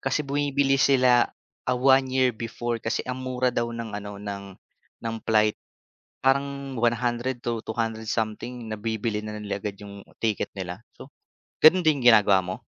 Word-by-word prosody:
kasi 135 +3 -1
bumibili 140 -1 +1
sila, 125 -3 +4 0.4
ah, 125 - +2
1 130 +1 +4
year 130 -1 +2
before 115 +1 -4
kasi 115 - -2
ang 125 0 -4
mura 130 -1 -1
daw 120 0 -1
ng 115 -2 -6
ano 105 0 -6
ng, 100 -1 -6 0.6
ng 115 - -2
flight. 110 -1 +4 0.7
Parang 140 0 +1
100-200 120 -2 -1
something 115 +2 -3
nabibili 110 0 -2
na 105 0 -5
nila 100 -1 -4
agad 100 -1 -4
'yong 100 -1 -10 0.2
ticket 110 -3 0
nila. 90 +1 -5 0.2
So, 140 - -13 0.5
ganon 180 +4 +7
din 145 -3 +4
ginagawa 105 -5 +6
mo? 90 +1 -6
120 Hz, 145 wpm, -25 LUFS, 105-130 Hz, 0.7 s, ganon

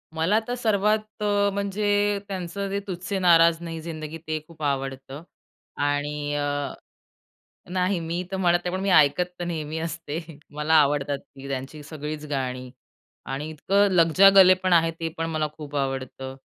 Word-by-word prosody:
मला 175 +7 +2
तर 245 - -2
सर्वात 215 -2 +2 0.2
अ, 205 -1 +2
म्हणजे 205 +1 +1
त्यांचं 195 +1 -4
ते 200 +1 -1
तुझसे 185 +1 -3
नाराज 170 -2 +5
नही 165 -1 -5
ज़िंदगी 155 -1 -6
ते 155 0 -1
खूप 160 -2 -11
आवडतं. 135 +1 -3 0.5
आणि 145 0 -1
अ 145 0 -2 1.0
नाही, 185 0 +1
मी 170 +2 -3
तर 190 - -2
म्हणत 175 -2 +3
नाही, 180 +1 -2
पण - - -3
मी 195 - 0
ऐकत 155 +1 +5 0.2
तर - - -1
नेहमी 160 -2 -4
असते, 165 -1 -4 0.4
मला 150 +2 +1
आवडतात 145 -1 +3
ती 140 0 -13
त्यांची 135 +3 -5
सगळीच 150 0 -6
गाणी 130 -2 -3 0.6
आणि 140 +3 -3
इतकं 200 +6 +2
लगजा 175 +2 +6
गले 185 -1 +9
पण 185 -1 -2
आहे, 165 -1 +5
ते 165 0 -4
पण 165 - -1
मला 155 -1 -1
खूप 145 -2 -7
आवडतं. 135 -1 -3
165 Hz, 160 wpm, -25 LUFS, 145-185 Hz, 1.0 s, गले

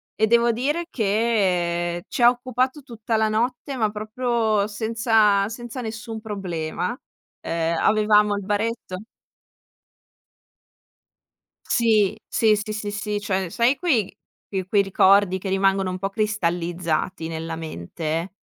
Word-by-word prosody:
E 220 - +2
devo 235 +1 +4
dire 295 +9 -1
che 185 -6 0
ci - - -3
ha 240 - +8
occupato 255 +3 -1
tutta 230 -3 -4
la 220 0 +2
notte, 245 +5 -1
ma 220 -3 +1
proprio 220 -1 0
senza 220 -2 +2
senza 240 +2 -7
nessun 225 -1 -6
problema. 180 -6 -3 0.6
Uhm, 165 0 0
avevamo 210 -1 +3
il 200 - -4
baretto 210 -1 -2 2.7
Sì. 215 -4 +2
Sì, 220 -2 +3
sì, 210 +1 -4
sì, 210 -1 -4
sì. 210 0 -3
Cioè, 190 -2 -1
sai 235 +9 +2
quei 255 - +1 0.3
quei 190 -2 -3
quei 200 0 +4
ricordi 195 0 +4
che 190 - -6
rimangono 195 0 +2
un 185 - -4
po' 195 +1 -2
cristallizzati 175 -5 -1
nella 165 0 -5
mente? 160 - -4
210 Hz, 125 wpm, -23 LUFS, 185-225 Hz, 2.7 s, ha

